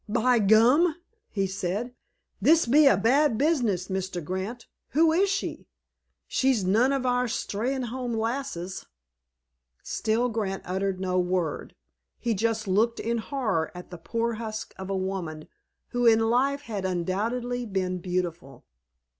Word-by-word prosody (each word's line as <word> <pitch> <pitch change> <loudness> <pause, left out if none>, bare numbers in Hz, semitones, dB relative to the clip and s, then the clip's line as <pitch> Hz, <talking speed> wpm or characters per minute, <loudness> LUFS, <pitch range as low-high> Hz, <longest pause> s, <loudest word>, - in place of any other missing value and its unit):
"By 240 +2 +3
gum!" 235 - +5 0.3
he 195 -2 -1
said, 195 +5 -3 0.5
"this 330 +1 +5
be 285 +5 +6
a - - +5
bad 260 +1 +3
business, 240 - +1
Mr. 190 -2 -3
Grant. 190 +8 -4 0.3
Who 320 +3 +5
is 390 +4 +3
she? 390 +1 -3 0.6
She's 260 -7 +1
none 225 +8 +3
of 270 -2 -1
our 250 0 +2
Steynholme 245 +1 -2
lasses." 225 -6 -3 1.0
Still 225 +3 0
Grant 210 -5 -3
uttered 190 +1 -2
no 185 -1 0
word. 180 -3 -2 0.4
He 235 -1 -1
just 220 +1 -1
looked 220 +5 +2
in 235 +1 -1
horror 220 - -1
at 180 +1 -10
the 175 - -8
poor 230 +6 -1
husk 220 0 -5
of 190 0 -7
a 195 - -1
woman 185 -5 -4 0.4
who 245 -1 +1
in 225 0 +4
life 275 +3 +2
had 215 -8 -5
undoubtedly 225 +7 -2
been 185 -2 -2
beautiful. 175 -7 -4
220 Hz, 140 wpm, -26 LUFS, 190-245 Hz, 1.0 s, be